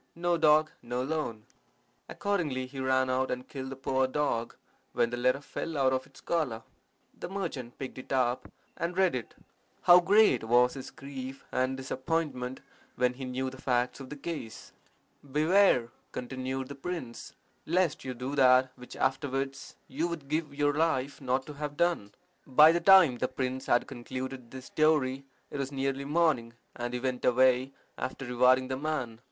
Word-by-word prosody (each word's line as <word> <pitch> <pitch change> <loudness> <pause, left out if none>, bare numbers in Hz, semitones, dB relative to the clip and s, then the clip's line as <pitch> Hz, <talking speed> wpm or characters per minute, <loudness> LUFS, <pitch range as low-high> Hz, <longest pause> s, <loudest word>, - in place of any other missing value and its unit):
No 175 0 +1
dog, 155 -1 +4
no 125 +1 -3
loan.' 130 -7 -3 0.6
Accordingly 160 -11 -1
he 135 +1 -9
ran 130 0 +2
out 130 +1 0
and 125 0 -4
killed 130 -2 -6
the 135 - -6
poor 130 0 0
dog, 130 -4 -1 0.4
when 115 - +1
the - - -1
letter 130 +3 +1
fell 160 +2 -5
out 130 -1 +3
of 130 0 -2
its 140 - -18
collar. 130 -10 -1 0.6
The - - -5
merchant 160 -11 -5
picked 130 -1 -6
it - - -11
up 125 -2 0 0.2
and 175 +2 -3
read 190 -2 +4
it. 125 -3 -5 0.5
How 175 0 +9
great 200 - +4
was 120 +2 +4
his 135 -2 -7
grief 135 -1 -8
and 130 +1 0
disappointment 130 -1 -3 0.3
when 125 0 +2
he 130 +1 -7
knew 130 +1 -3
the 130 - -12
facts 125 0 0
of 135 -1 -9
the 150 - -6
case! 145 -7 -7 0.6
"Beware," 155 -4 +4 0.2
continued 130 +1 -4
the - - -5
prince, 135 -4 -6 0.3
"lest 175 -1 +1
you 130 -1 -5
do 125 +3 -5
that 130 -2 +5
which 125 0 -11
afterwards 135 0 -2
you 155 +6 -1
would 165 -5 -6
give 155 +2 -1
your 145 0 +2
life 145 -4 0
not 130 0 0
to 150 - -8
have 145 0 -5
done." 170 -13 +1 0.4
By 150 +4 +7
the 170 +1 0
time 170 -9 +7
the 130 - +1
prince 130 0 -3
had 120 - +3
concluded 130 0 -6
this 130 +1 -9
story 140 -4 +1 0.3
it 145 - -5
was 135 0 -3
nearly 135 0 -2
morning, 145 -7 +1 0.2
and 120 0 -4
he - - -1
went 130 0 -2
away, 130 +1 +3 0.3
after 130 +1 -4
rewarding 125 +1 +3
the 130 0 -3
man. 135 -6 -3
130 Hz, 170 wpm, -29 LUFS, 125-150 Hz, 0.6 s, How